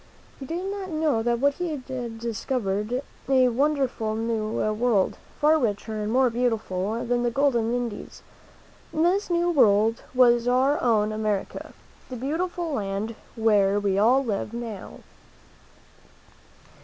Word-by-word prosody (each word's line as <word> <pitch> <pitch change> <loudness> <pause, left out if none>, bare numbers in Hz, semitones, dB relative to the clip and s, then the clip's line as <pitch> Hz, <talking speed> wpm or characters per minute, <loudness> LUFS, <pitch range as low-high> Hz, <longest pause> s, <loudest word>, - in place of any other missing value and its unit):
He 270 - -8
did 345 +3 -3
not 390 -1 -4
know 310 -7 +1
that 240 +5 +1
he 355 -1 -1
had 255 -5 -5
discovered 230 0 -2 0.3
a 260 -2 +5
wonderful 260 -4 0
new 225 -1 -2 0.2
world, 220 -3 +1 0.2
far 310 +1 +4
richer 215 -2 -2
and 210 +1 -2
more 255 0 +3
beautiful 225 -3 -1
than 240 0 0
the 240 - +1
golden 235 -3 +1
Indies. 240 -3 -4 0.7
This 355 +6 +1
new 345 0 +1
world 225 -5 +3
was 240 -1 +4
our 260 +4 +2
own 215 -3 +2
America, 215 -2 -3 0.4
the 255 - -6
beautiful 330 +6 -2
land 205 -2 -3 0.2
where 205 -3 +3
we 200 -1 0
all 255 +6 +4
live 210 0 -3
now. 230 -5 -7
240 Hz, 130 wpm, -25 LUFS, 215-275 Hz, 0.7 s, a